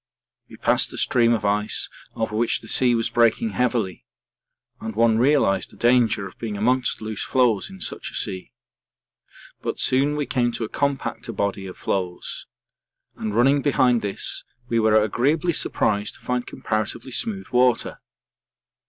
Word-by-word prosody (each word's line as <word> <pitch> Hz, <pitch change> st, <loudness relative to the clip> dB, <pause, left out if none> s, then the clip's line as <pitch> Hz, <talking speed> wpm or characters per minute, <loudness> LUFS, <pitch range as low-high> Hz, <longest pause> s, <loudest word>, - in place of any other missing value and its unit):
We -, -, -12 dB
passed -, -, +3 dB
a -, -, -7 dB
stream 120 Hz, -2 st, +3 dB
of 110 Hz, -3 st, 0 dB
ice 105 Hz, +1 st, +1 dB, 0.3 s
over 110 Hz, -1 st, -2 dB
which 115 Hz, +1 st, 0 dB
the 110 Hz, -, -12 dB
sea 125 Hz, +1 st, +3 dB
was 115 Hz, -1 st, -1 dB
breaking 120 Hz, -, +2 dB
heavily 115 Hz, -7 st, -1 dB, 0.8 s
and 110 Hz, -2 st, -6 dB
one 115 Hz, 0 st, +3 dB
realised 130 Hz, -6 st, +2 dB
the -, -, -17 dB
danger 120 Hz, -4 st, +3 dB
of 95 Hz, -, -11 dB
being 110 Hz, -3 st, -4 dB
amongst 125 Hz, +3 st, +1 dB
loose 110 Hz, -1 st, -3 dB
floes 125 Hz, -, +1 dB
in 190 Hz, 0 st, -12 dB
such -, -, -3 dB
a -, -, -10 dB
sea. 95 Hz, -3 st, -3 dB, 1.1 s
But -, -, -4 dB
soon 140 Hz, +3 st, +3 dB
we 150 Hz, -1 st, -1 dB
came 120 Hz, -2 st, 0 dB
to 115 Hz, -, -3 dB
a 110 Hz, -, -4 dB
compacter 140 Hz, -4 st, -2 dB
body 100 Hz, -1 st, -2 dB
of 90 Hz, -, -9 dB
floes, 90 Hz, -2 st, -3 dB, 0.7 s
and 105 Hz, -1 st, -4 dB
running 135 Hz, +4 st, +4 dB
behind 125 Hz, -4 st, +3 dB
this 100 Hz, -1 st, 0 dB, 0.2 s
we 115 Hz, -1 st, +1 dB
were 110 Hz, -1 st, +4 dB
agreeably 145 Hz, -, +1 dB
surprised 105 Hz, -7 st, -1 dB
to -, -, -17 dB
find 125 Hz, 0 st, -2 dB
comparatively 110 Hz, +4 st, -3 dB
smooth 195 Hz, -, -3 dB
water. 125 Hz, -1 st, +2 dB
115 Hz, 160 wpm, -23 LUFS, 105-130 Hz, 1.1 s, running